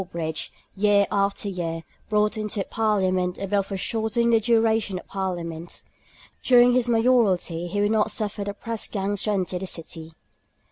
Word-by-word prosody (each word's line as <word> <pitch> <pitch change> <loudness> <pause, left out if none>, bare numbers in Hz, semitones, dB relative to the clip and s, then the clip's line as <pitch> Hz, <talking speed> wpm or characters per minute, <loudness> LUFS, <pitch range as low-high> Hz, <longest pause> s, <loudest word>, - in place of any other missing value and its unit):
Sawbridge, 165 -3 -4 0.2
year 205 0 +3
after 200 0 0
year, 165 -4 -3 0.3
brought 210 0 +2
into 210 -2 -2
Parliament 185 -5 +1
a 195 - -4
bill 200 +1 +2
for 195 0 -5
shortening 230 +3 0
the 225 - +5
duration 225 -3 +2
of - - -9
parliaments. 175 -3 -4 0.6
During 245 -1 +6
his 250 -1 +2
Mayoralty 220 -8 +2
he 205 +4 -1
would 205 +1 +2
not 220 -1 +2
suffer 210 -2 -2
the 200 0 -5
pressgangs 205 -3 -3
to - - 0
enter 185 -2 -1
the 190 - -5
city. 165 -1 -4
200 Hz, 155 wpm, -24 LUFS, 180-220 Hz, 0.6 s, During